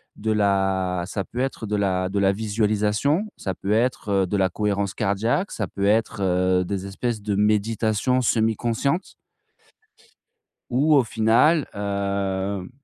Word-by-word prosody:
de 110 +1 -2
la 95 -3 +1
ça 100 0 -3
peut 120 - -8
être 130 -3 -2
de 105 0 -2
la 95 -2 0
de 100 +1 -1
la 95 0 +4
visualisation, 110 - 0
ça 95 - -3
peut 100 - -4
être, 115 0 0
heu, 95 -1 +2
de 100 +3 -1
la 95 -1 +2
cohérence 100 0 -1
cardiaque 110 - 0
ça 105 - -2
peut 100 +3 -3
être, 105 0 +1
heu, 90 0 +2
des 95 +1 -4
espèces 110 +3 -3
de 105 -1 -1
méditations 110 +4 +1
semi-conscientes 115 - 0 1.6
ou 145 +5 +3
au 135 -3 +5
final, 115 +8 +3
hem, 100 -1 -2
105 Hz, 145 wpm, -23 LUFS, 100-115 Hz, 1.6 s, au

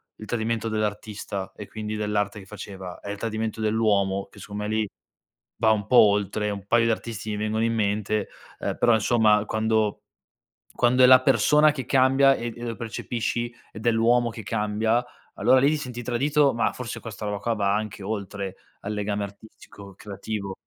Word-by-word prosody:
il 110 - -10
tradimento 115 0 -2
dell'artista 105 -2 -3
e 105 - -9
quindi 110 0 -5
dell'arte 105 -1 -1
che 95 - -12
faceva, 95 -3 -9
è 100 - -8
il 100 - -4
tradimento 110 0 -3
dell'uomo 105 -3 +1
che - - -15
secondo 105 0 -6
me 105 - -3
lì, 110 0 0 0.7
va 110 -1 +3
un 105 -2 0
po' 125 - +4
oltre, 105 0 +4
un 100 -1 -6
paio 115 +1 +4
di 115 - +3
artisti 110 -1 -4
mi - - -2
vengono 110 +1 -1
in 115 - 0
mente, 105 -1 0 0.3
uhm, - - -3
però 120 - +4
insomma 110 -2 +3
quando 110 -1 0 0.7
quando 125 +1 +3
è - - +9
la 130 0 +8
persona 150 +4 +4
che 135 -3 -5
cambia 135 +1 +4
e 120 -2 -4
e 120 - -9
lo 115 -1 -3
percepisci 120 +2 -3 0.2
ed 110 +2 -10
è - - +6
l'uomo 120 +1 +3
che 110 0 -8
cambia, 110 +3 0 0.3
allora 130 - +4
lì 140 +2 +4
ti 155 - +1
senti 125 -4 -6
tradito, 140 +4 +2
ma 115 - +1
forse 125 -2 -6
questa 110 -2 -7
roba 105 -1 -2
qua 115 +2 -1
va 100 -2 +1
anche 105 -2 -4
oltre 100 -2 -4 0.3
al 105 - -4
legame 105 0 -2
artistico 100 -1 -12
creativo. 100 0 -5
110 Hz, 185 wpm, -25 LUFS, 105-120 Hz, 0.7 s, è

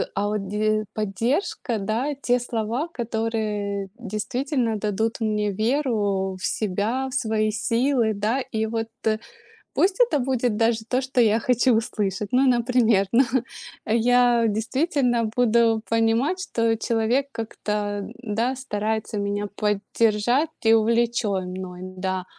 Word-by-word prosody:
а 205 +1 0
вот 210 -2 -2
де 215 +1 0
поддержка, 225 - -1
да, 230 +9 -1
те 245 0 +2
слова, 235 +5 -2
которые 215 - -2
действительно 235 - -2
дадут 215 +2 -1
мне 210 -1 0
веру 210 -5 0
в - - -3
себя, 220 +6 -1
в - - -10
свои 220 -3 +1
силы, 230 +1 +1
да. 220 +6 0
И 220 -3 -2
вот 225 0 -2 0.9
пусть 380 +3 +2
это 390 - +4
будет 245 -3 0
даже 225 0 +2
то, 255 - +1
что 260 -1 0
я 225 0 +4
хочу 250 -1 +3
услышать. 205 -2 -2
Ну, 260 +1 +4
например, 235 -4 +3
ну 260 +3 +5 0.6
я 240 +1 +3
действительно 240 +2 0
буду 230 -2 +3
понимать, 230 +10 +1
что 230 -8 0
человек 230 +5 0
как-то, 210 -2 -3
да, 235 +3 -1
старается 220 -3 -2
меня 205 0 -2
поддержать, 215 +6 +1
и 225 - +5
увлечён 225 -4 +1
мной, 180 -1 -7
да. 185 0 -3
225 Hz, 125 wpm, -24 LUFS, 210-245 Hz, 0.9 s, ну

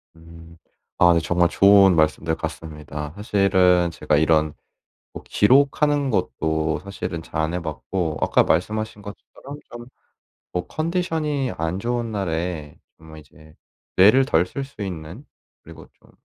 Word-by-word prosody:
음. 85 0 -15 0.4
아 90 -1 +5
네 85 - +3
정말 85 +1 +1
좋은 100 -2 +5
말씀들 80 +1 +1
같습니다. 75 -2 -7
사실은 95 -4 +2
제가 75 - -1
이런 75 -1 +2 0.6
뭐 - - -9
기록하는 140 +4 +2
것도 80 -6 -1
사실은 95 -4 -6
잘 80 - -5
안 80 +2 -1
해 90 - -2
봤고 80 +1 -4
아까 - - +3
말씀하신 105 +5 -1
것처럼 135 +7 -11
좀 120 0 -10 0.7
뭐 90 - -3
컨디션이 155 -5 -2
안 80 +3 -2
좋은 120 +1 -2
날에 85 -5 -4 0.2
정말 80 -1 -13
이제 75 +2 -19 0.4
뇌를 110 +8 +6
덜 90 -9 +2
쓸 135 +8 -6
수 135 -6 -13
있는 90 - -7 0.4
그리고 - - -13
좀 - - -25
90 Hz, 260 characters per minute, -22 LUFS, 80-110 Hz, 0.7 s, 뇌를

